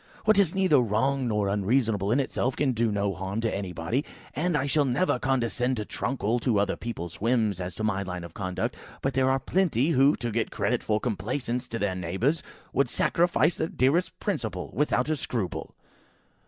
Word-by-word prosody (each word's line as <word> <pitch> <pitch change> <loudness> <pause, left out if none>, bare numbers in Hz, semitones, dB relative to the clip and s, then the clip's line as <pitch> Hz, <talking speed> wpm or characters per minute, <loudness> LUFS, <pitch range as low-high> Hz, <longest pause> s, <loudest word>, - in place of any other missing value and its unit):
"What 215 -1 +5
is 185 -4 +3
neither 185 -7 +4
wrong 125 +4 +1
nor 105 -3 +1
unreasonable 105 0 +1
in 125 - +3
itself 130 -1 -1
can 140 -2 +1
do 115 -2 +1
no 100 -1 0
harm 95 +4 -4
to 115 - 0
anybody, 95 - -2 0.3
and 170 +1 +1
I 135 - 0
shall 145 +1 +2
never 130 +1 +1
condescend 125 -1 0
to 105 - -3
truckle 120 -1 -1
to 115 -3 +1
other 100 -1 +1
people's 85 -9 -6
whims 110 -5 +1
as 90 +1 -5
to 110 - -4
my 100 -2 +1
line 90 -2 -5
of 85 -2 -9
conduct. 95 -2 -3 0.3
But 135 - 0
there 130 0 +3
are 135 - +3
plenty, 155 - +1
who, 140 0 +5
to 120 -2 -3
get 115 0 0
credit - - 0
for 105 -1 0
complaisance 120 +3 -2
to 115 - -4
their 100 -3 0
neighbours, 95 - 0 0.3
would 140 -2 +2
sacrifice 175 +3 +2
their 160 - 0
dearest 160 +6 +1
principle 110 - -3
without 130 +1 +1
a 155 - +1
scruple!" 115 - -4
120 Hz, 190 wpm, -27 LUFS, 100-135 Hz, 0.3 s, What